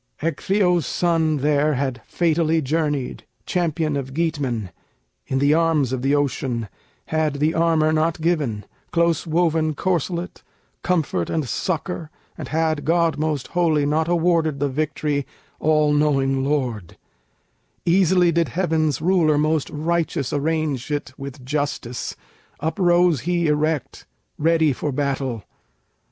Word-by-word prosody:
Ecgtheow's 175 +1 +1
son 165 -3 +1
there 145 +1 +2
Had 130 -2 -2
fatally 165 -1 +1
journeyed, 150 -2 -1 0.2
champion 160 -4 0
of 135 -1 -4
Geatmen, 140 - -1 0.6
In 135 - -1
the 140 +2 +3
arms 160 -5 +2
of 130 - -2
the 135 +2 +2
ocean, 130 -5 -1 0.4
had 155 -2 0
the 150 +3 +1
armor 160 -2 +2
not 160 +1 +1
given, 145 - -1 0.3
Close 170 -1 +1
woven 160 -1 +1
corselet, 175 +1 -2 0.4
comfort 155 - 0
and 155 -5 -1
succor, 160 - -3 0.3
And - - -7
had 160 -2 0
God 165 -1 +2
Most 155 -4 -2
Holy 160 -4 +2
not 155 +2 +1
awarded 165 -3 +1
the 145 0 0
victory, 145 0 -1 0.3
All 155 -1 +3
knowing 135 -3 +2
lord; 125 - -2 0.9
easily 180 0 +4
did 170 0 +1
heaven's 160 -5 0
Ruler 165 -4 +3
most 155 0 +1
righteous 160 -2 -1
arrange 150 -3 -1
it 145 -3 -3
with 140 -1 -9
justice; 140 -4 -3 0.4
Uprose 175 - +2
he 170 +3 0
erect 150 0 -1 0.3
ready 160 -2 +3
for 145 +3 -3
battle. 135 -4 -2
155 Hz, 125 wpm, -22 LUFS, 140-165 Hz, 0.9 s, easily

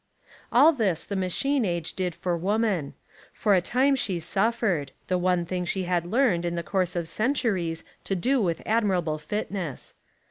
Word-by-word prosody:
All 285 +7 +7
this 200 - 0
the 200 - -4
machine 235 +9 +1
age 170 -4 -2
did 180 -3 -2
for 180 -2 -1
woman. 195 -3 0 0.4
For 210 - +2
a 185 - +4
time 265 +9 +2
she 195 -9 -1
suffered 195 - 0
— - - -39
the 185 - +2
one 180 -1 +1
thing 180 +1 -2
she 190 +2 -2
had 175 -1 0
learned, 215 -5 +2
in 175 0 -2
the 170 - -2
course 180 +3 -1
of 170 -2 -2
centuries, 205 - 0 0.2
to 195 - -1
do 250 +8 +1
with 170 -4 -1
admirable 185 -8 +1
fitness. 180 - -4
185 Hz, 175 wpm, -26 LUFS, 170-220 Hz, 0.4 s, All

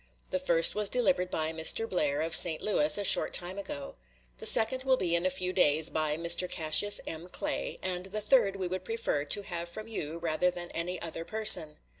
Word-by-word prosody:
The 185 - -1
first 170 -2 +3
was 210 -1 0
delivered 245 -7 0
by 160 -1 -3
Mr. 165 +7 +2
Blair, 150 -6 -2
of 160 0 -1
St. 160 -2 +5
Louis, 155 -8 +3
a 205 - -3
short - - +4
time 180 +3 -4
ago; 145 -8 -8 0.4
the - - -1
second 255 +4 +3
will 265 -1 +1
be 175 -6 -2
in 170 +2 0
a - - 0
few 185 0 -4
days, 155 -3 +2
by 155 -1 -2
Mr. 170 +2 +1
Cassius 165 +6 +3
M. 165 +3 -8
Clay, - - -4
and 180 0 -3
the 210 +2 -4
third 210 -2 +1
we 190 -2 -5
would 185 +1 -6
prefer 225 -9 -3
to 205 +7 +1
have 170 -2 -6
from 215 +5 -10
you 165 -8 -6
rather 170 +1 -1
than 175 -1 -8
any 175 +2 -5
other 165 0 -7
person. 190 -7 +3
180 Hz, 210 wpm, -28 LUFS, 160-200 Hz, 0.4 s, St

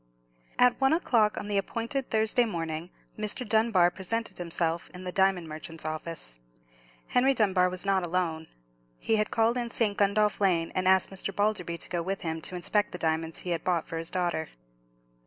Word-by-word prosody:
At 250 +2 +4
one 270 +3 +4
o'clock 230 -10 +2
on - - -4
the 205 -1 +1
appointed 235 +6 -3
Thursday 220 +2 +2
morning, 165 -4 -4 0.3
Mr. 215 +3 -2
Dunbar 220 -5 +4
presented 220 +5 -4
himself 170 -1 -1
in 180 - -8
the 180 - -3
diamond 190 -3 +2
merchant's 160 +1 -6
office. 155 - -5 0.7
Henry 265 +2 +3
Dunbar 190 -5 +3
was 185 +1 -4
not 195 -2 +2
alone. 165 -2 -1 0.5
He 220 - +1
had 215 - +1
called 230 +2 +2
in 240 -1 -2
St. 220 -3 +1
Gundolph 205 +1 +2
Lane, 175 -4 +2
and 185 0 0
asked 190 +1 +4
Mr. 195 0 -3
Balderby 195 -4 0
to - - -3
go 175 -1 0
with 190 +3 -3
him 160 -1 -3
to 180 - -3
inspect 205 +4 +1
the - - -4
diamonds 160 -1 -1
he 180 - -4
had 170 - -1
bought 175 -3 0
for 165 - -4
his 165 - -5
daughter. 175 -3 -1
185 Hz, 185 wpm, -28 LUFS, 170-215 Hz, 0.7 s, At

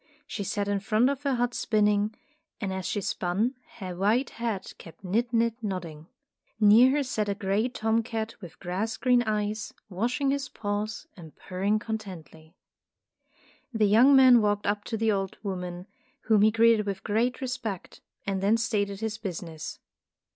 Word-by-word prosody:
She 205 - -5
sat 200 +1 -2
in 200 0 0
front 220 +6 +2
of 280 -1 -4
her 280 -2 0
hut 245 0 0
spinning, 210 -1 +1 0.4
and 195 -4 -3
as 190 -1 -3
she 205 - -1
spun, 195 +7 -1 0.2
her 185 -4 -6
white 215 +8 +1
head 230 -4 -4
kept 165 +3 -13
nid 230 +6 0
nid 230 -1 +2
nodding. 170 -7 -5 0.5
Near 220 +4 +7
her 290 - +1
sat 215 -5 -2
a 200 - 0
gray 205 +4 0
tom 225 -2 +1
cat 225 -1 -4
with 175 -2 -11
grass 200 +5 -3
green 250 -1 +3
eyes, 215 -1 -2 0.2
washing 245 +8 0
his 280 -1 -2
paws 210 +4 -3
and 165 -6 -12
purring 195 +3 -1
contentedly. 185 -8 -7 1.2
The 220 -3 +2
young 235 +7 +6
man 255 -3 +8
walked 205 -1 0
up 205 0 0
to 225 - -3
the 220 0 +2
old 195 -2 -2
woman, 180 -2 -4 0.4
whom 215 -2 +3
he 215 - +6
greeted 225 -1 +4
with 195 -1 -3
great 230 +4 0
re 265 - -3
spect, 225 -7 -5 0.2
and 195 -1 -1
then 205 +3 +3
stated 205 -3 -1
his 220 0 -3
business. 170 -6 -6
210 Hz, 170 wpm, -27 LUFS, 195-230 Hz, 1.2 s, man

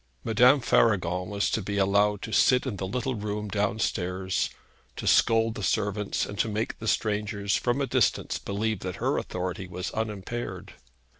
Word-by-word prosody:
Madame 125 +5 +5
Faragon 90 -7 +2
was 100 0 0
to 110 - 0
be 100 +1 -3
allowed 100 +1 +2
to 110 - -5
sit 125 +1 +4
in 120 -7 -3
the 95 - -3
little 125 +6 -2
room 105 -1 -3
downstairs, 95 -3 -1 0.5
to - - -6
scold 115 0 +4
the 105 - -7
servants, 105 0 0
and 100 - -8
to - - +2
make 110 +2 -3
the 115 - -6
strangers 105 -2 0
from 120 +2 0
a 140 - +1
distance - - +1
believe 110 +1 -2
that 90 -1 -5
her - - 0
authority 90 0 -4
was 90 +1 -5
unimpaired. 110 +2 -4
105 Hz, 165 wpm, -27 LUFS, 95-110 Hz, 0.5 s, Madame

